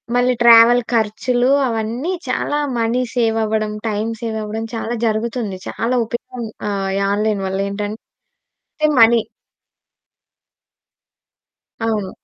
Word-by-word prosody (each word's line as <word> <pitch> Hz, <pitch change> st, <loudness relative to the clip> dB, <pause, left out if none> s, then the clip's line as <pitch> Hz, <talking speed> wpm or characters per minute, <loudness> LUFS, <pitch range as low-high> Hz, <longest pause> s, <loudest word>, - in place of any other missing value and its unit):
మళ్ళీ 250 Hz, +1 st, +3 dB
ట్రావెల్ 235 Hz, +1 st, +7 dB
ఖర్చులు 245 Hz, +3 st, +1 dB, 0.2 s
అవన్నీ 230 Hz, +7 st, -2 dB, 0.2 s
చాలా 275 Hz, +3 st, -1 dB, 0.2 s
మనీ 230 Hz, +2 st, +1 dB
సేవ్ 225 Hz, -2 st, +1 dB
అవ్వడం. 215 Hz, 0 st, -1 dB, 0.2 s
టైమ్ 215 Hz, +1 st, -1 dB
సేవ్ 225 Hz, -2 st, -3 dB
అవ్వడం. 215 Hz, +1 st, -4 dB
చాలా 225 Hz, +1 st, -3 dB
జరుగుతుంది. 220 Hz, -2 st, -2 dB
చాలా 235 Hz, +3 st, -1 dB
ఉపయోగం 240 Hz, +1 st, -6 dB, 0.2 s
ఆహ్, 195 Hz, -1 st, -2 dB
ఈ -, -, 0 dB
ఆన్లైన్ 210 Hz, -1 st, 0 dB
వల్ల 190 Hz, +1 st, -2 dB
ఏంటంటే 205 Hz, +2 st, -6 dB, 0.8 s
మనీ. 230 Hz, 0 st, +6 dB, 2.6 s
అవును. 210 Hz, -4 st, -1 dB
225 Hz, 110 wpm, -19 LUFS, 215-240 Hz, 2.6 s, ట్రావెల్